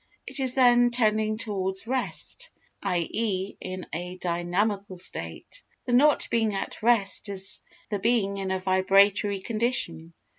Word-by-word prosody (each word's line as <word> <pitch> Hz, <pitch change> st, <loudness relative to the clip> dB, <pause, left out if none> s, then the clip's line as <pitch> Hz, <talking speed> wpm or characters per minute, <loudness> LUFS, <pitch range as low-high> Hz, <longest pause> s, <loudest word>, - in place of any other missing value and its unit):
It 270 Hz, +2 st, -5 dB
is 260 Hz, -2 st, +3 dB
then 245 Hz, -2 st, +5 dB
tending 215 Hz, -2 st, +1 dB
towards 195 Hz, -3 st, -3 dB
rest, 260 Hz, -, -2 dB, 0.3 s
i.e. 190 Hz, +2 st, -1 dB
in 185 Hz, 0 st, -6 dB
a 180 Hz, +3 st, -5 dB
dynamical 185 Hz, +3 st, -1 dB
state. 345 Hz, -, -6 dB, 0.2 s
The 245 Hz, -, -2 dB
not 290 Hz, +4 st, +4 dB
being 225 Hz, -3 st, +1 dB
at 195 Hz, -, -5 dB
rest 215 Hz, -3 st, +2 dB
is 195 Hz, 0 st, -2 dB, 0.3 s
the 205 Hz, -, -1 dB
being 200 Hz, -2 st, +1 dB
in 190 Hz, -1 st, -3 dB
a 190 Hz, -, 0 dB
vibratory 195 Hz, +2 st, +3 dB
condition. 190 Hz, -8 st, -1 dB
200 Hz, 135 wpm, -26 LUFS, 185-235 Hz, 0.3 s, then